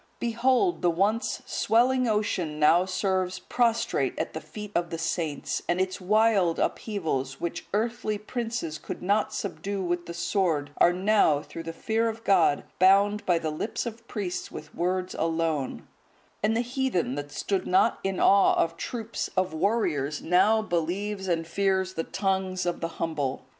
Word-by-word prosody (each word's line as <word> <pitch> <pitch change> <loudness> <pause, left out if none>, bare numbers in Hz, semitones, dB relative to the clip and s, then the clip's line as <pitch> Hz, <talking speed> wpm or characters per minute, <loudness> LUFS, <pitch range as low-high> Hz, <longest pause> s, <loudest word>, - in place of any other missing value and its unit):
Behold, 255 - +1
the 175 - +3
once 200 +7 0
swelling 250 +2 +2
ocean 205 -8 -1
now 165 +4 +5
serves 185 -1 -1
prostrate 230 +4 0
at - - -3
the - - -5
feet 210 -1 -9
of 170 0 0
the 165 - -4
saints; 165 -3 -2
and 175 - +1
its 185 +1 -1
wild 200 -3 +3
upheavals, 135 - -2
which 170 0 -4
earthly 220 0 -1
princes 225 -6 -4
could - - -7
not 205 +3 +1
subdue 200 -1 -3
with 175 0 -2
the 170 - -5
sword, 170 -5 0
are 175 - +6
now, 185 -5 +3
through 165 - -8
the 165 0 -5
fear 225 +6 0
of 225 +1 -7
God, 175 -8 +3 0.2
bound 200 +3 +5
by 175 -2 +4
the 160 -2 -2
lips 155 +12 -3
of 230 0 -7
priests 195 -5 -4
with - - -9
words 185 +1 -1
alone; 160 -4 -1 0.5
and 220 +2 +2
the - - +2
heathen 245 - -1
that 145 +1 -5
stood 195 +3 -2
not 185 - +3
in 195 -1 -1
awe 200 0 +5
of 165 0 0
troops 230 +2 -4
of 185 -2 +1
warriors, 155 -7 0
now 210 +6 +3
believes 190 +3 -2
and 165 -2 0
fears 190 +1 0
the 165 - -2
tongues 190 -1 -1
of 175 -1 -2
the 165 - 0
humble! 145 -5 -2
185 Hz, 165 wpm, -27 LUFS, 165-215 Hz, 0.5 s, are